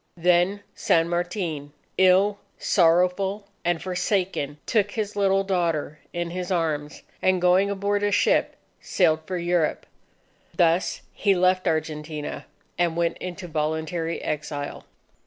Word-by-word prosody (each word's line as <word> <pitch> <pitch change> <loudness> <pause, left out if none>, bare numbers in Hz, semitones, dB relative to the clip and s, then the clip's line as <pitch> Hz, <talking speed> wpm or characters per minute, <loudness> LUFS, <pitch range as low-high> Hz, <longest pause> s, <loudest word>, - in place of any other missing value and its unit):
Then 180 +4 +2
San 165 0 +2
Martin, 175 -5 -3 0.2
ill, 190 +2 +4 0.2
sorrowful, 180 +3 +2 0.2
and 175 -1 +1
forsaken, 180 -5 -1
took 210 -3 +2
his 210 -2 -3
little 195 -1 +2
daughter 165 -6 -1
in 175 -1 -3
his 180 0 -4
arms, 155 -4 -2 0.2
and 185 -1 +3
going 180 +3 +4
aboard 200 +1 0
a 205 0 +1
ship - - +2 0.2
sailed 160 -4 +2
for 185 - -2
Europe. 175 -2 0 0.7
Thus 170 +1 +2
he 200 -2 +2
left 185 +1 +2
Argentina, 155 -1 -3 0.3
and 170 -1 +1
went 170 -1 0
into 180 0 -6
voluntary 160 +1 -2
exile. 145 -1 -4
175 Hz, 120 wpm, -25 LUFS, 160-190 Hz, 0.7 s, ill